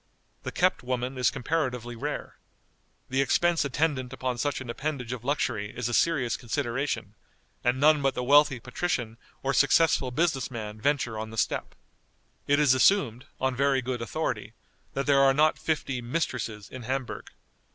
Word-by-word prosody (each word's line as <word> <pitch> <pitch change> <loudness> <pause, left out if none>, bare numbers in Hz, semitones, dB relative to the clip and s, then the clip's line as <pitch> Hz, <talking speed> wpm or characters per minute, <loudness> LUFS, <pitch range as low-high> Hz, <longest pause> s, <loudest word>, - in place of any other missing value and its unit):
The - - -5
kept - - +2
woman 125 +1 -2
is 125 -1 +3
comparatively 125 -4 -2
rare. 115 - -5 0.7
The 135 +1 +2
expense 170 +6 +2
attendant 140 -2 -1
upon 130 -2 -3
such 145 +2 -1
an 130 - -8
appendage 125 -1 -3
of 120 -2 -7
luxury 120 -7 -1
is 125 -2 -1
a 120 - -3
serious 130 -6 +2
consideration, 130 +2 -2 0.5
and 125 +1 +1
none 150 +1 +5
but 135 -1 +1
the 125 - -2
wealthy 140 0 +5
patrician 120 -6 -3 0.3
or 135 +1 0
successful 145 -2 +4
business 150 -1 0
man 110 -3 -6
venture 125 -5 0
on 110 0 -5
the 110 - -9
step. - - -1 0.7
It 145 - +4
is 145 -4 +5
assumed, 130 - +3
on 130 -1 0
very 135 -1 +2
good 125 -1 -3
authority, 115 - -3 0.4
that 135 - -1
there 140 -1 +4
are 135 -1 +5
not 155 +2 +3
fifty 140 -5 -2
"mistresses" 120 - -3
in 130 - -9
Hamburg. 130 +1 -4
130 Hz, 160 wpm, -27 LUFS, 120-145 Hz, 0.7 s, none